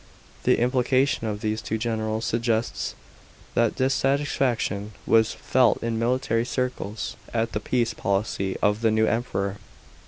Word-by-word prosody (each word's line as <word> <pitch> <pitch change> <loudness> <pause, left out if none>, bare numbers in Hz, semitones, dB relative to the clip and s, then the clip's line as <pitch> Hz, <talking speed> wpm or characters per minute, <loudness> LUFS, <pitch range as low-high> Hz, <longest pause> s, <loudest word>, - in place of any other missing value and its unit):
The - - +4
implication 125 0 +2
of 105 -1 -3
these 110 0 -1
two 110 - -2
generals 110 -1 -2
sugge 115 0 +1
ts - - -4 0.6
that 115 -2 +2
dissatisfaction 130 -6 0
was 110 -1 +4
felt 125 -4 +2
in 115 -1 -1
military 115 -1 +1
circles 125 -4 -3 0.2
at 115 0 +1
the - - -1
peace 120 +1 0
policy 100 -2 -1
of 105 +2 +2
the 115 - +4
new 110 0 +3
Emperor. 100 -4 -1
115 Hz, 135 wpm, -25 LUFS, 110-125 Hz, 0.6 s, The